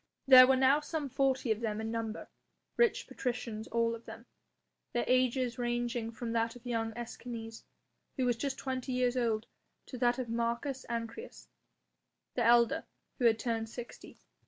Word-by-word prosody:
There 255 -1 +10
were 265 - +5
now 265 +2 +4
some 300 -1 -4
forty 265 -2 +1
of 215 - +1
them 215 -2 -2
in 220 0 -3
number, 225 -1 -4 0.5
rich 475 -3 +2
patricians 235 -3 -4
all 230 0 +1
of 230 0 -8
them, - - -10 0.7
their 240 - 0
ages 255 -1 +1
ranging 240 -1 -1
from 230 0 -5
that 230 0 0
of 245 0 -14
young 225 -2 -1
Escanes 230 -1 -7 0.6
who 260 - +1
was 245 -1 +2
just 270 +3 -3
twenty 260 -1 -3
years 250 0 +1
old 230 -3 0 0.4
to 250 - -8
that 245 0 +3
of 255 -2 -3
Marcus 235 +4 -2
Ancyrus, 235 - -6 0.8
the 240 - 0
elder, 235 0 +4 0.4
who 245 - +1
had 225 -2 +5
turned 225 -1 -2
sixty. 240 +1 -10
240 Hz, 160 wpm, -32 LUFS, 230-255 Hz, 0.8 s, There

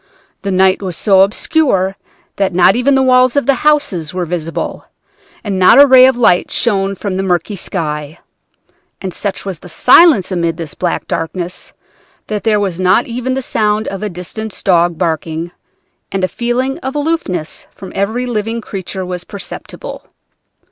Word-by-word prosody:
The 200 - -3
night 190 0 +3
was 185 -4 -5
so 195 -3 +4
obscure 195 - +1 0.4
that 195 -3 0
not 185 +2 +5
even 265 +3 +2
the 265 - +3
walls 255 0 +4
of 285 - +1
the 275 - +4
houses 285 - +1
were 180 -1 -1
visible, 165 -1 -4 0.6
and 200 -4 -2
not 185 +8 +6
a 285 - +10
ray 260 -1 +7
of 260 -2 +1
light 200 -7 +3
shone 195 -4 0
from 195 -1 -4
the - - 0
murky 185 +2 -1
sky. 155 -4 -4 0.8
And 190 -2 -5
such 200 +1 -4
was 190 -5 -5
the 180 - -13
silence 255 - +5
amid 170 -2 -1
this 165 -4 -6
black 175 - -3
darkness, 175 +2 -4 0.5
that 210 -2 -4
there 215 -2 +2
was 190 -4 -2
not 185 +5 +3
even 250 +2 -3
the 265 - -3
sound 215 -2 0
of 195 - -6
a 210 - -2
distant 190 +4 -7
dog 175 -2 +2
barking, 165 0 -2 0.6
and 195 -1 -2
a - - +3
feeling 245 +5 -2
of 265 +2 -5
aloofness 290 - -3
from 190 - -11
every 220 +6 -1
living 225 -1 -2
creature 190 -3 -6
was 180 -1 -5
perceptible. 200 +1 -9
195 Hz, 170 wpm, -15 LUFS, 180-240 Hz, 0.8 s, a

